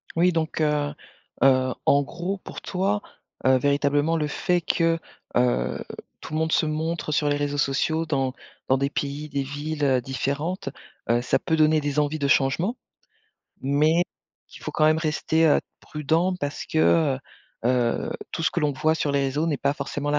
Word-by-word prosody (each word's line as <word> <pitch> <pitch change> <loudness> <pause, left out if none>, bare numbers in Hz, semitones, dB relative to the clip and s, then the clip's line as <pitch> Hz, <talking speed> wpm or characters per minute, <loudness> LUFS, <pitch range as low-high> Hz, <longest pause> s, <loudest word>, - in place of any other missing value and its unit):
Oui 175 +2 +4
donc, 160 -1 -1
heu, 150 -1 +1 0.5
heu, 130 -1 +4
en 140 0 +5
gros, 175 +6 -4
pour - - -9
toi, 195 +2 -1 0.5
heu, 130 0 +6
véritablement 145 +3 +2
le 155 -2 0
fait 175 +3 0
que, 165 0 +1 0.4
heu, 65 - +1 0.4
tout - - -8
le 155 - 0
monde 160 0 0
se 160 - +3
montre 160 +1 -2
sur 150 0 +2
les 145 - +2
réseaux 145 0 -2
sociaux, 155 +3 +1
dans 135 -4 0 0.3
dans 130 - +3
des 140 +1 -1
pays, 145 +2 -3
des 140 -1 -2
villes, 145 +2 -4
heu, 130 -3 +3
différentes. 140 - -2 0.4
Heu, 120 +1 +3
ça 125 - +2
peut 160 - 0
donner 155 0 +4
des 145 0 -2
envies 150 +1 +1
de 140 - +1
changement, 140 - +2 0.8
mais 150 +5 +3 0.5
il - - -11
faut - - -5
quand 155 - +2
même 155 +1 +4
rester, 160 +1 +1
heu, 150 - +4 0.2
prudent, 160 +5 0
parce 145 -5 -4
que, 160 - -1 0.4
heu, - - -6 0.5
heu, 125 -2 +1 0.2
tout - - -3
ce - - +2
que - - -2
l'on 150 -3 +1
voit 155 +4 +1
sur 145 -2 -1
les 140 - +2
réseaux 140 +4 0
n'est 150 -4 0
pas 140 +2 +1
forcément 145 +1 -3
la 150 - +2
150 Hz, 185 wpm, -25 LUFS, 140-160 Hz, 0.8 s, heu